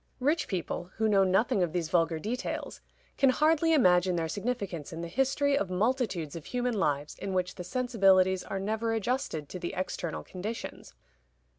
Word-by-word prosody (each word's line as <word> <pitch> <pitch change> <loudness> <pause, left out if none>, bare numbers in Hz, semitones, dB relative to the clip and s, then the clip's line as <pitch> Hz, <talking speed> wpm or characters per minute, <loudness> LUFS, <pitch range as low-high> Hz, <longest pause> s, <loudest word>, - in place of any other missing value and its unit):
Rich 295 +6 +1
people, 175 -1 -3
who 220 - +1
know 200 -2 +4
nothing 195 +4 +2
of 175 -3 0
these 170 -3 -1
vulgar 165 -2 +2
details, 230 +10 -4 0.4
can 275 - +6
hardly 315 +4 +3
imagine 180 - +4
their 165 -1 -1
significance 200 - -3
in 165 0 -6
the 170 - -4
history 270 +7 +1
of 200 -9 0
multitudes 190 - 0
of 165 - -7
human 245 0 -1
lives 150 -8 -1
in 195 - -4
which 185 0 0
the 180 - -7
sensibilities 190 -4 +3
are 195 - -4
never 220 +3 -1
adjusted 225 - -2
to 185 - -6
the 175 - -4
external 180 -2 -3
conditions. 210 +5 -7
195 Hz, 170 wpm, -29 LUFS, 175-245 Hz, 0.4 s, can